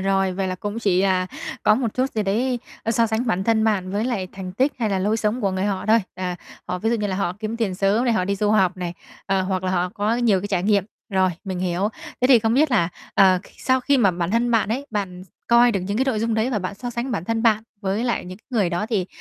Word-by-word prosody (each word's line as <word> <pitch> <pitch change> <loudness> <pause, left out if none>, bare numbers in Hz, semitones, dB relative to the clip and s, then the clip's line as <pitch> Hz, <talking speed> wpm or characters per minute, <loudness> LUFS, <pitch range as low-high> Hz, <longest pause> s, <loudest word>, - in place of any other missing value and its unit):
rồi, 195 -1 +1
vậy 190 0 -2
là 185 - -2
cũng 205 +4 -5
chỉ, 190 -5 +2
à, 185 -1 +2 0.4
có 210 - +5
một 230 -2 -2
chút 260 +1 0
gì 215 - -1
đấy, 240 +6 0 0.2
ơ, 225 - 0
so 230 0 +3
sánh 225 +3 -1
bản 190 -4 0
thân 225 -1 +2
bạn 195 -4 0
với 205 +2 0
lại 210 -7 -2
thành 185 -1 -7
tích 260 +9 +1
hay 220 -3 0
là 195 - +1
lối 205 +4 +1
sống 220 +2 -1
của 200 -4 +1
người 190 +1 -1
họ 200 -1 -2
thôi. 220 +1 +5 0.2
À, 180 -1 -3 0.3
họ 180 - -2
ví 225 +4 0
dụ 235 - +2
như 210 - -1
là 190 -2 -2
họ 180 -3 -1
kiếm 220 +1 -3
tiền 220 -5 -1
sớm 200 +5 +2
này, 240 - +2
họ 185 - +1
đi 200 +2 0
du 210 +1 +1
học 190 -3 +3
này, 175 -1 -4 0.3
ờ, 195 -1 +1
hoặc 185 0 -2
là 185 - 0
họ 180 0 +1
có 215 +3 0
nhiều 225 -6 +3
cái 205 - -5
trải 190 -3 0
nghiệm. 200 -1 +2 0.3
Rồi, 190 -1 +2
mình 185 -2 -4
hiểu. 180 +2 0 0.3
Thế 250 - +4
thì 255 -3 +8
không 225 +1 +1
biết 295 +3 +3
là, 205 -9 +3 0.3
ờ, 190 -2 +5
khi - - -18
sau 260 0 +2
khi 280 +2 +2
mà 205 -6 +4
bản 175 0 -2
thân 235 +2 +1
bạn 225 -3 +2
ấy, 260 +6 -2
bạn 190 -4 -3 0.3
coi 235 0 +6
được 195 - 0
những 200 +4 -2
cái 260 - +3
nội 250 -6 0
dung 230 0 0
đấy 225 +3 +1
và 225 - 0
bạn 185 +1 -4
so 245 +4 -6
sánh 240 +2 -3
bản 170 -8 -2
thân 225 +3 -1
bạn 220 -2 +3 0.2
với 200 +3 -1
lại 240 - -1
những 185 +1 -9
cái - - -34
người 210 -8 +1
đó, 175 +5 -1
thì, 195 -6 0
205 Hz, 290 wpm, -22 LUFS, 185-230 Hz, 0.4 s, thì